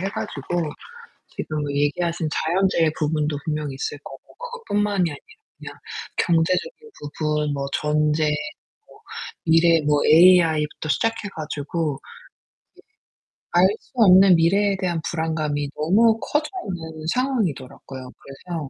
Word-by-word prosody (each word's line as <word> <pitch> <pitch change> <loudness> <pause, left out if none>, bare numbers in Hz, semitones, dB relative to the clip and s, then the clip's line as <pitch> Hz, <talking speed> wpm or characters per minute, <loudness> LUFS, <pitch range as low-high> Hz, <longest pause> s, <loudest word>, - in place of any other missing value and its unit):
해 190 - -1
가지고 175 -5 -3 0.6
지금 155 -1 -4
얘기하신 160 +4 -1
자연재해 170 0 +1
부분도 150 -1 0
분명히 150 -3 -3
있을 135 +2 -4
거고 135 - -10 0.2
그것 485 -1 -9
뿐만이 205 -4 +1
아니라 145 - -8 0.4
그냥 - - -9 0.4
경제적인 185 - 0
부분, 150 0 -2
뭐 140 -1 -3
전쟁, 150 0 +1 0.5
뭐 - - -19 0.4
미래 165 0 +4
뭐 150 -1 +2
AI 165 -2 +6
부터 155 - -6
시작해 225 +3 -1
가지고 150 -1 -3 1.4
예. 175 - -1
알 185 - +7
수 - - -29
없는 190 -5 +7
미래에 195 +5 +2
대한 175 -3 -1
불안감이 155 -3 -2
너무 220 +9 +3
커져 300 +5 -1 0.2
있는 160 -3 -7
상황이더라고요. 160 - -3
그래서 155 +1 -7
160 Hz, 280 characters per minute, -22 LUFS, 150-185 Hz, 1.4 s, 알